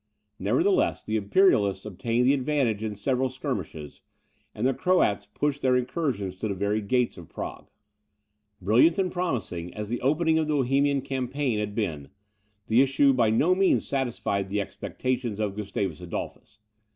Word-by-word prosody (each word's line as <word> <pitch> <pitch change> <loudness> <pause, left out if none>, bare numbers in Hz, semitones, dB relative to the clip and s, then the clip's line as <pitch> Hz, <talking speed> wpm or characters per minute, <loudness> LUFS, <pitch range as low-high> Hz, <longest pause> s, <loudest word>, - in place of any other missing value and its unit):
Nevertheless, 375 +2 +1
the 110 - -3
Imperialists 100 - +3
obtained 115 +4 -1
the 135 - +5
advantage 130 -6 0
in 110 -1 -3
several 130 +5 0
skirmishes, 105 - -5 0.5
and 110 - -2
the 135 - +3
Croats 105 - +1
pushed 145 +6 -2
their 130 -1 +3
incursions 125 - -2
to 110 - -2
the 100 - -2
very 100 +3 0
gates 125 +4 0
of 85 - -12
Prague. - - -7 0.9
Brilliant 115 - +4
and 185 -2 0
promising 110 - -3
as 105 -1 -5
the 120 - -3
opening 160 +4 +2
of 155 - 0
the 155 - +1
Bohemian 140 +1 +2
campaign 130 -2 -2
had 105 -1 -3
been, 80 -11 -3 0.6
the 115 +3 +4
issue 135 +1 +4
by 120 -4 +3
no 145 +11 +3
means 190 0 +2
satisfied 115 -7 -1
the 105 +1 -1
expectations 120 +2 -3
of 105 -2 -1
Gustavus 100 -2 -3
Adolphus. 95 +4 -7
120 Hz, 155 wpm, -26 LUFS, 100-140 Hz, 0.9 s, the